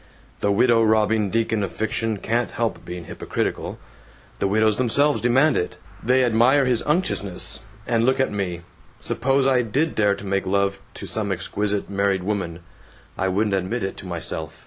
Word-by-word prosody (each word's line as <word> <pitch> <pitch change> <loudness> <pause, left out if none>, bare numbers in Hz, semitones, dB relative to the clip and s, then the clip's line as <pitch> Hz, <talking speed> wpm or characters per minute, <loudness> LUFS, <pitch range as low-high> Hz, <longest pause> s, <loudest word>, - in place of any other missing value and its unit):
The 100 - +1
widow 115 +3 +4
robbing 110 -1 +2
deacon 110 0 0
of 100 - -2
fiction 110 0 -2
can't 115 +4 -1
help 115 -1 -2
being 90 -1 -7
hypocritical. - - -3 0.6
The 100 - +1
widows 110 +1 +2
themselves 130 +1 +2
demand 130 +6 +3
it! 90 - -2 0.2
They 130 +2 +3
admire 125 +4 +4
his 125 -3 +2
unctuousness. 150 - +1 0.3
And 115 -1 +1
look 130 +2 +2
at 130 - +1
me. 95 -4 -3 0.4
Suppose 135 +1 +1
I 130 -2 +4
did 135 +8 0
dare 105 -2 +2
to 100 - -10
make 95 -1 -1
love 100 0 +1 0.2
to - - -7
some 105 -2 -3
exquisite 100 +2 -2
married 100 -1 0
woman. 90 -4 -3 0.5
I 95 - -1
wouldn't 100 +2 +1
admit 95 +5 -1
it 95 - -3
to 95 - -9
myself. 80 -2 -5
110 Hz, 170 wpm, -23 LUFS, 100-120 Hz, 0.6 s, widow